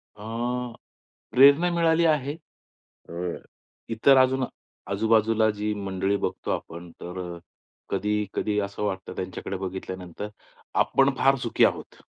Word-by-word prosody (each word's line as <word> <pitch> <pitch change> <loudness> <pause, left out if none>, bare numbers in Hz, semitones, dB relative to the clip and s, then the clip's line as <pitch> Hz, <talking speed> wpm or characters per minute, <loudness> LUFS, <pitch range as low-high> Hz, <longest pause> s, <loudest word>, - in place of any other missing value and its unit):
अ, 105 - -12 1.1
प्रेरणा 140 +7 +6
मिळाली 165 0 +3
आहे. 150 -2 +1 0.7
अ, - - -9 0.8
इतर 115 +5 +5
अजून, 130 0 +4 0.4
आजूबाजूला 110 +1 +3
जी 105 +1 -2
मंडळी 100 -1 -1
बघतो - - -3
आपण 85 +1 -5
तर 90 +1 -6 0.2
अ, - - -11 0.5
कधी-कधी 105 0 -1
असं 100 +1 -3
वाटतं 95 -2 -3
त्यांच्याकडे 95 +1 -4
बघितल्यानंतर, 95 0 -6 0.5
आपण 135 0 +4
फार 135 0 +4
सुखी 115 - +4
आहोत, - - -2
105 Hz, 115 wpm, -26 LUFS, 95-130 Hz, 1.1 s, प्रेरणा